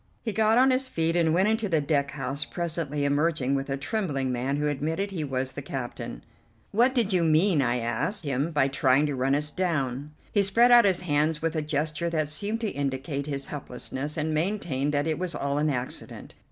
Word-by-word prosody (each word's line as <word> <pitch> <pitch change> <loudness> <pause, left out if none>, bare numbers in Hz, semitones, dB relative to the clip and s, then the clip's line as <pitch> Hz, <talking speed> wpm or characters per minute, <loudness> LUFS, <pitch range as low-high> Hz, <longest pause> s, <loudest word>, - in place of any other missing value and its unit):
He 220 - -2
got 220 +1 +3
on 260 +1 +5
his 260 0 0
feet 165 -3 0
and 165 -2 +3
went 185 +5 +3
into 220 -1 0
the 160 -3 +2
deck 140 -1 0
house, 135 0 -2
presently 160 -4 -3
emerging 145 -2 +1
with 135 0 -2
a 135 - -1
trembling 145 - -2
man 130 +3 -1
who 150 0 0
admitted 160 +8 -2
he 170 -5 -3
was 130 -2 -2
the 145 - -6
captain. 125 - -6 0.5
"What 245 +5 +3
did 220 -5 +1
you 180 -2 +3
mean," 160 +1 +3
I 125 -1 +1
asked 170 - -1
him, 140 +3 0
"by 150 -4 +2
trying 135 +1 +3
to 145 -2 -2
run 135 +2 +1
us 150 +1 -1
down?" 150 -6 -2 0.2
He 205 - +3
spread 230 +5 +4
out 240 -2 +8
his 185 -3 +2
hands 150 -1 +1
with 165 +1 -2
a 155 - 0
gesture 155 +2 -1
that 155 -3 -1
seemed 205 +9 0
to 220 - -1
indicate 140 +1 -3
his 140 -2 -2
helplessness, 140 +1 -5
and 155 0 -1
maintained 155 -5 -1
that 145 0 0
it 160 -1 -1
was 180 -2 -3
all 140 +1 -1
an 150 +1 +1
accident. 125 -3 -4
150 Hz, 210 wpm, -27 LUFS, 140-180 Hz, 0.5 s, out